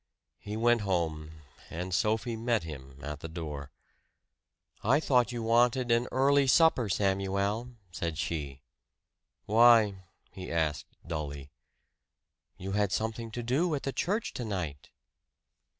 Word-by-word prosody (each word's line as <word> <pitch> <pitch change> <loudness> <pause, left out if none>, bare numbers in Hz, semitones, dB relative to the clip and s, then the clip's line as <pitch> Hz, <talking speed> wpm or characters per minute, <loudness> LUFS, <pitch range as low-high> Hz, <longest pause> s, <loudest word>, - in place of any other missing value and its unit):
He 105 +1 -6
went 120 0 +3
home, 80 -5 -2 0.3
and 90 +2 -5
Sophie 110 +5 0
met 115 -2 0
him 70 -4 -9
at 75 0 -5
the 80 - -6
door. 75 -4 -6 1.1
"I 130 +7 +4
thought 125 -5 +2
you 120 -1 -4
wanted 120 +2 +3
an 120 +1 +3
early 140 +1 +3
supper, 130 -6 +4
Samuel," 100 +5 0 0.2
said 85 -2 -3
she. 70 -5 -4 0.8
"Why?" 115 -1 +6 0.4
he 95 - -8
asked 80 -3 -1 0.2
dully. 70 -4 -5 1.1
"You 95 +2 -5
had 100 -1 +1
something 115 +2 -2
to 120 +2 -5
do 150 +8 +1
at 140 - -5
the 135 - -2
church 205 - -1
tonight!" 90 - -4
105 Hz, 125 wpm, -30 LUFS, 80-120 Hz, 1.1 s, Why